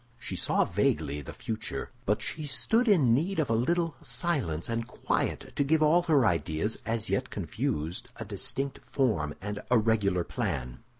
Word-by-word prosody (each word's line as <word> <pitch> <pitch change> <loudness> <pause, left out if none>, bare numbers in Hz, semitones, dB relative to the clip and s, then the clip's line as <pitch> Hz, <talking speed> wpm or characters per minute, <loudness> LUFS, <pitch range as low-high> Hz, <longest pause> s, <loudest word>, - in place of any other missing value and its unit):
She - - -5
saw - - +2
vaguely 75 -1 0
the 70 - -8
future; 110 0 -4 0.2
but 105 +1 +1
she 155 -2 -4
stood 225 - +3
in 155 - +5
need 170 +10 +1
of 150 -7 +1
a - - +3
little 165 +7 +1
silence 130 - -1
and 115 0 -2
quiet 125 - -2
to - - +2
give 155 +2 +3
all 160 +3 +5
her 155 -7 +3
ideas, 85 +1 0
as 115 -1 0
yet 130 0 0
confused, 100 - -3
a 115 - -6
distinct 130 +7 -2
form 95 - 0
and 105 0 -4
a 125 - +5
regular 105 -5 +2
plan. 60 -6 -3
115 Hz, 170 wpm, -29 LUFS, 100-145 Hz, 0.2 s, in